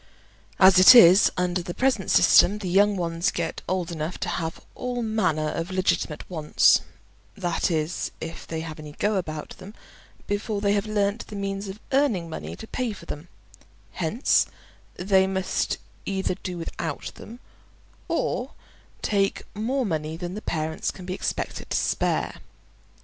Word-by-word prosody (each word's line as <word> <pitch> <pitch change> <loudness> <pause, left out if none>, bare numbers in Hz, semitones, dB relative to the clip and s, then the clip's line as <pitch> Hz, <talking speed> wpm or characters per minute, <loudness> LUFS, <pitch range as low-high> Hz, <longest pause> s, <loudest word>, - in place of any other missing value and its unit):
As 185 -1 +7
it 185 +7 +10
is, 190 -3 +8
under 180 0 0
the 175 0 -6
present 255 -8 +1
system, 205 - +6
the 205 -3 -5
young 200 +3 +4
ones 170 0 0
get 170 -1 -3
old 180 -2 -1
enough 160 +1 -4
to - - -1
have 165 -1 -3
all 245 -1 -3
manner 180 -9 0
of 165 +3 -3
legitimate 185 -4 -1
wants 155 -4 +3 0.6
(that 175 -3 0
is, 160 0 -1
if 165 +1 -7
they 160 -1 -4
have 160 -1 -7
any 150 -1 -9
"go" 210 +7 0
about 155 -5 -4
them) 195 +4 -11 0.5
before 205 +1 -2
they 200 0 +2
have 205 +1 0
learnt 205 +1 -1
the 210 - -8
means 195 0 -3
of 195 +2 -7
earning 260 -11 +2
money - - -6
to - - -9
pay 240 0 -3
for - - -12
them; 150 +4 -7 0.6
hence 185 - +1 0.5
they 190 +1 +3
must 190 -1 -1 0.3
either 190 -1 -1
do 180 -2 -5
without 165 -2 -5
them, 235 +2 -11 0.7
or - - -2 0.5
take 200 -2 +1
more 250 +5 -1
money 160 -3 -3
than 175 +1 -5
the 210 - -6
parents 160 -3 -2
can 185 - -8
be 180 - -3
expected - - -4
to - - +1
spare. - - 0
185 Hz, 160 wpm, -25 LUFS, 165-205 Hz, 0.7 s, it